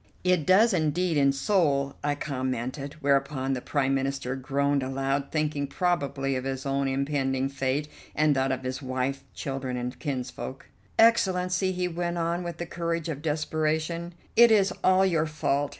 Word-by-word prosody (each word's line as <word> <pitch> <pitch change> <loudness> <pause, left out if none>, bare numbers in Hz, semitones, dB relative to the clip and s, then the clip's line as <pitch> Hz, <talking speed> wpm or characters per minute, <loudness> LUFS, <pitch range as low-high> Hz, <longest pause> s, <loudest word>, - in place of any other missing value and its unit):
"It 180 -5 +2
does 215 +4 +5
indeed 165 +1 +1
in 140 -1 +4
Seoul," 140 -2 +1
I 145 0 +1
commented, 130 -1 -3
whereupon 140 -1 +1
the 125 - -3
Prime 135 -1 0
Minister 135 -1 -1
groaned 140 +1 0
aloud, 135 +1 -1
thinking 150 -2 -1
probably 140 -4 0
of 130 - -2
his 135 0 -4
own 140 0 0
impending 135 -1 0
fate 135 +2 -1 0.3
and 155 -1 +3
that 135 0 +1
of 130 0 -2
his 130 +2 -4
wife, 130 +1 -2
children, 135 -2 -3
and 125 0 -4
kinsfolk. 130 -1 -5 0.3
"Excellency," 185 -4 +3
he 180 -1 -1
went 175 0 -2
on 170 +1 0
with 170 -1 -5
the 175 - -4
courage 170 -1 -3
of 145 -3 -4
desperation, 155 +2 -1 0.2
"it 235 0 +8
is 200 -3 +4
all 185 +1 +5
your 165 -4 +1
fault. 145 -2 0
145 Hz, 160 wpm, -27 LUFS, 135-170 Hz, 0.3 s, it